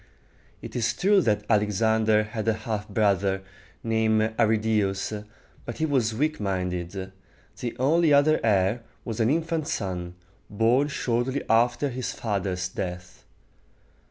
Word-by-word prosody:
It - - -8
is 115 -2 0
true 200 +1 +4
that 105 - +1
Alexander 110 +1 +2
had 110 +1 -5
a 110 - +3
half 105 -2 -3
brother, 100 -2 +1 0.4
named 110 -1 +1
Ar 115 - +5
ri 110 +1 +3
dæ´us, 105 -1 -1 0.4
but 120 - -7
he 160 - 0
was 125 -7 +1
weak 155 +5 0
minded. 95 -1 -3 0.5
The 120 -1 -4
only 155 +5 +3
other 145 +2 +5
heir 105 +1 +2 0.2
was 115 -2 -4
an 115 0 +3
infant 160 0 0
son, 90 - -3 0.3
born 115 +7 +2
shortly 130 -1 -1
after 120 +5 +2
his 125 -1 -4
father's 95 -4 -2
death. 90 -1 -7
110 Hz, 135 wpm, -26 LUFS, 100-125 Hz, 0.5 s, Ar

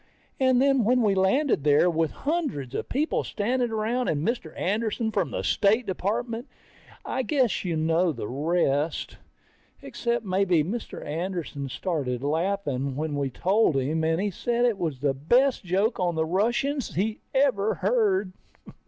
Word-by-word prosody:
And 260 -2 +4
then 270 -2 +3
when 245 +3 +3
we 205 -2 +3
landed 195 - +2
there 150 +3 +4
were 165 -2 +1
hundreds 275 - -3
of - - -4
people 295 +5 0
standing 240 +3 -1
around, 225 +3 -1
and 150 +4 0
Mr. 230 -9 -2
Anderson 220 +3 -1
from - - 0
the - - -4
State 220 +4 +2
Department. 225 +6 -2 0.6
I 260 - -1
guess 260 -4 +1
you 175 -3 -1
know 165 +2 +2
the 120 - -5
rest. 150 +1 0 0.6
Except 235 -1 -3
maybe 185 -4 +2
Mr. 215 +8 -5
Anderson 160 -4 -4
started 135 -6 -2
laughing 145 -4 -1
when 155 +1 -2
we 140 -1 -1
told 190 - +2
him, 150 +5 0
and 160 +1 +1
he 205 +1 -1
said 240 +6 0
it 230 -5 +1
was 150 -7 -3
the 140 -2 +2
best 240 - +2
joke 195 +6 0
on 175 -2 0
the 160 0 +1
Russians 235 - 0
he 210 +4 -1 0.2
ever 245 -7 +2
heard. 200 -3 +1
195 Hz, 155 wpm, -26 LUFS, 160-235 Hz, 0.6 s, And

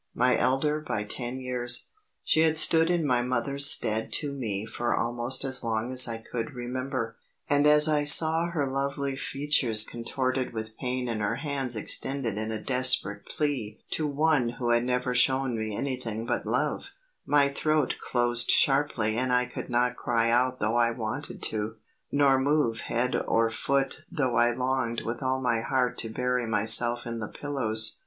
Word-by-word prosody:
My 125 +1 +2
elder 135 +4 0
by 130 -8 -4
ten 120 +4 -6
years, 125 -1 +1 0.3
she - - +1
had 160 0 +3
stood 160 +1 +5
in 175 -3 0
my 125 -3 +1
mother's 130 +3 +1
stead 110 -4 +2
to 145 -3 -1
me 110 -7 -4
for 120 +1 -2
almost 120 +3 -1
as 130 -1 -1
long 115 +1 -2
as 130 0 +6
I 115 -1 -4
could 115 +3 -6
remember, 125 -1 -4 0.3
and 145 +1 +3
as 150 +1 +6
I 150 -1 +2
saw 160 +2 +5
her 155 -4 -1
lovely 140 +1 -3
features 135 -6 0
contorted 130 +3 -3
with 110 0 -6
pain 125 0 -3
and 115 -2 -3
her 105 +2 -1
hands 135 -3 -1
extended 120 +1 0
in 110 0 -4
a 110 - -4
desperate 125 -5 +1
plea 130 -8 -3
to 155 - -1
one 145 -3 +1
who 120 -2 -1
had 120 0 +2
never 125 0 -1
shown 130 0 +2
me 110 -2 -4
anything 115 -4 -4
but - - -3
love, - - -1 0.4
my 145 -1 +4
throat 155 0 -1
closed 120 -1 +2
sharply 135 -6 +2
and 130 +1 0
I 125 0 +2
could - - -8
not 125 0 +1
cry 115 -1 0
out 125 +2 +1
though 110 +3 0
I 120 -1 +3
wanted 115 +4 -6
to, 110 +1 -2 0.4
nor 140 -2 +3
move 135 -5 0
head 125 +2 -1
or 115 0 +1
foot 135 +3 -1
though 140 -8 -1
I 120 +1 +3
longed 125 -1 -2
with 115 +1 -4
all 130 0 -1
my 120 -3 0
heart 125 +1 -1
to 115 - 0
bury 125 +1 -2
myself 115 +2 +3
in 115 -1 -5
the 110 - -5
pillows. 110 -7 0
125 Hz, 175 wpm, -27 LUFS, 115-140 Hz, 0.4 s, as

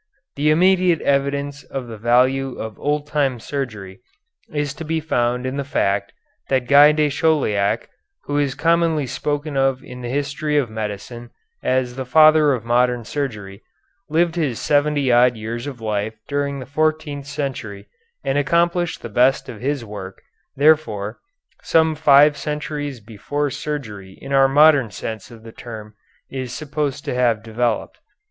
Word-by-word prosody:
The 145 +2 +1
immediate 180 +1 +4
evidence 140 +1 -1
of 130 0 -6
the 115 -1 -8
value 125 +3 +2
of 110 -2 -7
old 150 0 -1
time 140 -4 0
surgery 110 -7 -5 0.5
is 145 -2 -2
to 165 - -8
be 160 +1 -1
found 125 -5 -1
in 130 +2 -3
the 140 - -1
fact 100 -7 -1 0.4
that 130 -2 +1
Guy 145 +2 +8
de 150 0 +2
Chauliac, 135 -11 +1 0.4
who 145 0 -1
is 140 -2 0
commonly 165 -3 +2
spoken 145 +3 -3
of 135 -1 +1
in 125 0 -10
the 120 - -5
history 145 +3 -1
of 130 -6 0
medicine 110 +3 -6 0.3
as 130 -1 0
the 130 - -2
Father 155 +1 +6
of 115 -3 -4
Modern 120 0 +1
Surgery, 105 -8 -5 0.5
lived 165 +2 +2
his 140 -9 -1
seventy 145 -2 +2
odd 120 0 +5
years 115 +4 -5
of 135 -4 -7
life 110 0 -2
during 140 0 -2
the 130 - -7
fourteenth 155 -1 -1
century 130 -9 -5 0.4
and 135 +1 +1
accomplished 170 +3 +1
the - - -4
best 125 +4 +2
of 115 -3 -9
his 135 -2 -2
work, 95 -3 -8 0.4
therefore, 120 -9 +2 0.4
some 160 -1 +3
five 145 0 +5
centuries 150 -2 -4
before 130 +7 -3
surgery 105 -11 -6
in 135 0 -6
our 135 0 +5
modern 145 -3 +5
sense 110 0 -6
of 115 -2 -14
the 115 - -10
term 110 -2 -9 0.3
is 130 -2 -5
supposed 145 -1 -3
to - - -2
have 120 -3 +1
developed. 115 0 -2
135 Hz, 155 wpm, -21 LUFS, 120-150 Hz, 0.5 s, Guy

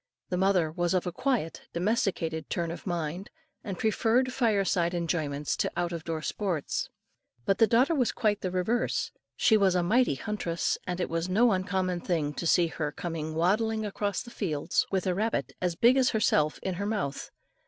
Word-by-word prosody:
The 180 - -1
mother 185 -4 +2
was 175 +2 0
of 180 - +1
a 180 - -2
quiet, 220 - -2
domesticated 170 -4 -1
turn 170 -2 -1
of 175 - -8
mind, 175 +2 -3 0.3
and 195 -4 -5
preferred 235 +5 +2
fire 220 -6 +2
side 175 -2 +1
enjoyments 155 -4 -1
to - - 0
out 175 0 0
of 165 -1 -5
door 160 -2 -3
sports; 180 -7 -2 0.6
but 195 - +1
the 225 - +6
daughter 255 +9 +4
was 255 -7 +2
quite 210 -2 0
the 185 - -1
reverse. 185 +7 0 0.2
She 220 - +4
was 195 -3 +3
a 180 - +2
mighty 230 - +3
huntress, 170 0 -2
and 180 0 -2
it 180 - 0
was 165 +2 -2
no 225 +5 +4
uncommon 185 -1 0
thing, 155 -5 -1
to 170 - -3
see 175 +1 +5
her 160 -2 -3
coming 160 -1 -4
waddling 215 +6 +1
across 205 -1 -2
the 240 - -12
fields 155 -11 -1
with 190 -1 -1
a 185 - +1
rabbit 220 +5 -1
as 180 -2 0
big 240 +8 +5
as 260 -1 +4
herself 155 -8 +2
in 190 - -1
her 200 - -1
mouth. 195 -11 -2
185 Hz, 190 wpm, -28 LUFS, 165-215 Hz, 0.6 s, the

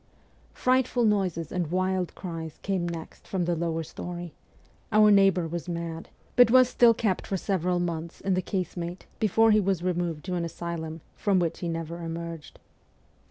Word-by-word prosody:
Frightful 255 -1 +2
noises 185 -7 0
and 175 -4 -1
wild 185 0 0
cries 165 -4 -6
came 185 -3 -1
next 165 -1 -8
from 185 -3 -1
the 175 0 +1
lower 165 0 -1
story; 175 +1 -7 0.6
our 215 0 +6
neighbour 195 -4 +4
was 170 +2 -5
mad, 170 -1 -5 0.3
but 245 -2 +7
was 255 +1 +7
still 240 -2 +5
kept 210 -5 -1
for 195 - -1
several 180 -2 0
months 170 -1 -3
in 195 - 0
the 185 - +1
case 185 0 -3
mate 175 +1 -5
before 225 +1 +4
he 215 - +5
was 190 -3 0
removed 175 -4 -1
to 185 - -3
an 175 -1 -1
asylum, 165 -1 -5
from 200 -2 +1
which 170 -3 0
he 175 - -3
never 165 +1 -4
emerged. 165 -1 -6
175 Hz, 170 wpm, -27 LUFS, 170-195 Hz, 0.6 s, but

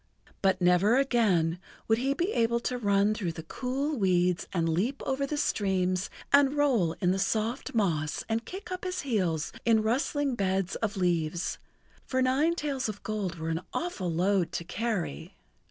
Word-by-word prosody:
But 190 -1 +2
never 180 +6 +4
again 200 -11 +2 0.3
would 225 0 +3
he 270 +2 0
be 345 +7 0
able 235 0 +2
to 250 +1 -2
run 200 -1 +3
through 185 -6 -3
the 160 - -7
cool 265 - -2
weeds 180 -2 +2
and 165 -3 0
leap 200 - 0
over 275 +1 -1
the 300 - -2
streams 185 -7 0 0.2
and 280 0 +5
roll 240 - +3
in 180 -1 0
the 190 - 0
soft 220 +6 -1
moss 160 -8 0
and 225 +1 -1
kick 380 - -8
up 365 0 -4
his 365 0 -2
heels 185 - -1
in 225 -2 +3
rustling 275 +4 0
beds 195 -3 0
of 210 -3 -2
leaves, 170 -2 0 0.5
for 260 - 0
nine 270 +6 +2
tails 280 -7 -2
of 205 -1 -7
gold 205 -5 -2
were 160 0 -4
an 165 +1 -1
awful[Pg 350 +1 -2
76] - - -7 0.2
load 185 -1 +2
to - - -3
carry. 195 - -3
215 Hz, 175 wpm, -29 LUFS, 180-260 Hz, 0.5 s, and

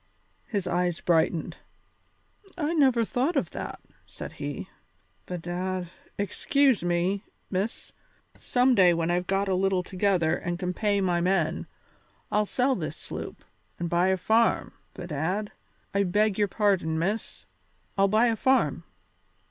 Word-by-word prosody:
His 200 -5 -2
eyes 180 -1 0
brightened. 165 -1 +1 1.0
"I 320 -1 0
never 260 -7 +4
thought 265 +10 0
of 275 - 0
that," - - -6 0.3
said - - -8
he. - - -5 0.6
"Bedad 180 0 -3 0.3
excuse 255 - +2
me, 175 +3 0 0.3
Miss 195 +4 -2 0.4
some 250 +1 +2
day 180 -6 +5
when 165 +1 0
I've 180 0 0
got 195 +1 +1
a 190 - +1
little 190 0 +1
together 180 -3 +1
and 175 -1 -3
can 180 0 -2
pay 205 +1 +1
my 175 -2 +1
men 175 -3 +1 0.6
I'll 210 0 +2
sell 260 +5 +2
this - - -4
sloop - - -7 0.3
and 170 -1 -3
buy 175 +2 +3
a 190 0 +2
farm, 220 +5 +2 0.2
bedad 180 +5 -2 0.4
I 200 - +2
beg 205 +2 +2
your 205 - +3
pardon, 190 -6 +1
Miss 195 +7 -2 0.5
I'll 195 0 +4
buy 215 +4 +4
a 230 -2 +2
farm." 260 +4 +2
190 Hz, 140 wpm, -27 LUFS, 175-215 Hz, 1.0 s, day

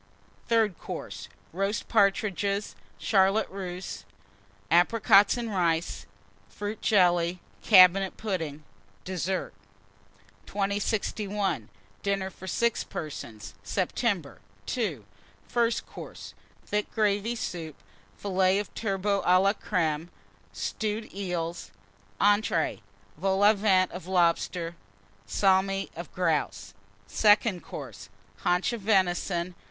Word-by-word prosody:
THIRD 220 -5 +2
COURSE. - - -7 0.2
Roast 195 +4 -1
Partridges. 200 -1 +1 0.2
Charlotte 195 +1 +3
Russe. 185 -1 -6 0.7
Apricots 200 +4 +5
and 235 -2 -3
Rice. 170 -3 0 0.4
Fruit 205 +1 -5
Jelly. 175 -3 +3 0.2
Cabinet 190 -1 +6
Pudding. 165 -8 -3 0.4
DESSERT. 185 0 -2 0.9
2061. 200 - -1 0.3
DINNER 195 -1 -1
FOR 190 - -11
6 235 +5 +1
PERSONS 110 -9 -7
(September). 185 - -1 0.4
II. 175 - -2 0.4
FIRST 235 -1 +1
COURSE. - - -10 0.3
Thick 210 0 -2
Gravy 210 +1 +1
Soup. 165 -8 -5 0.4
Fillets 190 -1 +2
of 205 - -11
Turbot 200 -1 0
à 180 +1 +5
la 195 +1 +3
Crême. 165 -7 -1 0.4
Stewed 215 0 -3
Eels. 175 -3 -4 0.5
ENTREES. 205 -4 +2 0.4
Vol 190 +2 +1
au 210 +1 +7
Vent 195 -3 +3
of 180 -1 -8
Lobster. 175 -1 +1 0.5
Salmi 195 - +2
of 170 +1 -8
Grouse. 160 - -1 0.3
SECOND 210 -3 +3
COURSE. - - -9 0.3
Haunch 180 +6 +1
of 235 - -4
Venison. 185 -3 +1
195 Hz, 95 wpm, -28 LUFS, 175-205 Hz, 0.9 s, au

